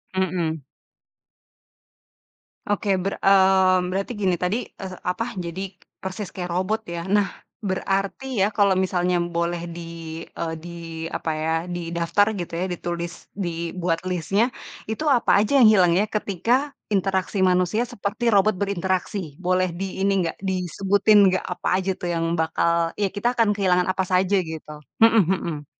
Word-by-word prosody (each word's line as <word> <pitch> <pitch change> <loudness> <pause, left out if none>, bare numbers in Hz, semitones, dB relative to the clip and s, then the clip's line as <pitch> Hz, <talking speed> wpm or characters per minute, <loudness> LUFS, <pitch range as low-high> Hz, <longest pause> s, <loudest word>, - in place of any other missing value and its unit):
Mhm. 170 -4 -1 2.1
Oke 205 0 0
ber 195 +2 -2
eee, 190 -1 +5
berarti 195 +5 -2
gini 185 -2 +2
tadi, 180 +6 0 0.3
eh 185 -1 -5 0.2
apa, 230 +6 -2
jadi 170 +3 -5 0.4
persis 190 +1 -5
kayak 180 -2 -4
robot 190 +5 0
ya. 170 - -3
Nah 205 0 +4 0.4
berarti 195 +5 -1 0.2
ya, - - +5
kalau 200 -2 +5
misalnya 180 -1 +1 0.2
boleh 170 0 -1
di, 170 - -6 0.6
eee, 165 -1 -2
di 175 - -8 0.5
apa - - -4
ya, 160 +1 0 0.2
didaftar 170 +4 +1
gitu 175 -1 -5
ya, - - +1
ditulis, 170 0 -4 0.2
dibuat 170 -2 -2
list-nya, 195 +5 +1 0.4
itu 220 +8 -3
apa 235 - +1
aja 215 - -1
yang 245 -4 +8
hilang 180 -4 +5
ya 205 - +3
ketika 210 0 -1 0.4
interaksi 190 +1 0
manusia 180 +5 +2
seperti 205 +3 -4
robot 205 +2 +4
berinteraksi? 190 0 -1 0.3
Boleh 185 0 +2
di 195 - -1 0.2
ini 200 - +3
nggak, 165 - -2
disebutin 195 +3 +2 0.2
nggak - - 0
apa - - -6
aja 190 - -3
tuh 175 - -4
yang 165 0 0
bakal 165 +1 +1
ya 200 - +3
kita 220 +4 0
akan 230 -3 +2
kehilangan 180 -2 +2
apa 190 0 +1
saja 185 +2 +2
gitu? 160 -3 -4 0.3
Mhm 225 0 +7
mhm. 155 -5 -4
185 Hz, 145 wpm, -23 LUFS, 175-200 Hz, 2.1 s, yang